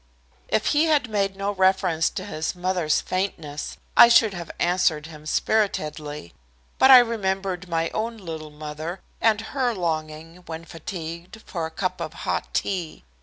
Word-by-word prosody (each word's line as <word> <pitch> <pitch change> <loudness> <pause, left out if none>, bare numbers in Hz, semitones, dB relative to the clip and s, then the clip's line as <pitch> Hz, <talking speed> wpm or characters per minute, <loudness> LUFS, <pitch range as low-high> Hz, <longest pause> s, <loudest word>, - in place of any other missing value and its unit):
If 215 - +1
he 300 +2 +4
had 295 -7 +2
made 195 -2 0
no 195 +1 -1
reference 185 -4 +2
to - - -6
his 155 +3 -3
mother's 180 -3 +1
faintness, 165 -6 -3 0.2
I - - +10
should 230 -3 +5
have 170 -3 -7
answered 175 -4 +1
him 155 -1 -11
spiritedly. 155 - -1 0.5
But 265 - +6
I 260 - +12
remembered 195 -6 0
my 165 0 0
own 225 +1 -3
little 160 -6 -7
mother, 155 +4 -6 0.2
and 220 -2 +4
her 255 -4 +1
longing 160 -1 -3
when 165 0 -6
fatigued 170 +4 -7
for 165 -3 -3
a - - -10
cup 185 +3 -3
of - - -4
hot - - -2
tea. 180 -5 -2
180 Hz, 155 wpm, -24 LUFS, 160-200 Hz, 0.5 s, I